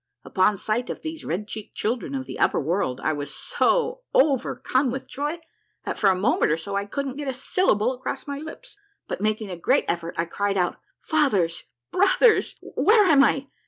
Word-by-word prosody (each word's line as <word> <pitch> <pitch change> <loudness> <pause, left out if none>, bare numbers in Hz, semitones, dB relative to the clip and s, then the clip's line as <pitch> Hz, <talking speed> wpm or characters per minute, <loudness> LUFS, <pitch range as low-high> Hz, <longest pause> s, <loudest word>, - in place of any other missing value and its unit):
Upon 200 +1 +2
sight 220 +5 -2
of - - -6
these 315 -1 -6
red 190 +6 -3
cheeked 215 -1 -8
children 240 +5 -2
of 265 -1 -3
the - - -8
upper - - +3
world 155 -4 -1
I 155 - +1
was 145 -1 -5
so - - 0
overcome 270 - +2
with 265 +2 -5
joy 295 +4 -3 0.5
that - - -3
for 200 - +5
a 190 - +3
minute 200 +7 +2
or 155 - +2
so 200 +5 -5
I 200 0 -1
couldn't 275 +4 -4
get 295 -1 -5
a 265 - -2
syllable 255 - +1
across 255 0 -5
my 280 -1 -5
lips, 405 +8 -10 0.3
but - - -4
making 215 -1 -1
a - - -4
great 170 - +2
effort 170 0 -2
I 165 - +1
cried 200 +3 -1
out, 180 -1 0
— - - -39
" - - -60
Fathers 210 - +2 0.3
I - - -5
Brothers! 470 +3 +4
Where 425 -1 +4
am 290 -6 +6
I 275 -1 +1
245 Hz, 205 wpm, -24 LUFS, 195-290 Hz, 0.5 s, am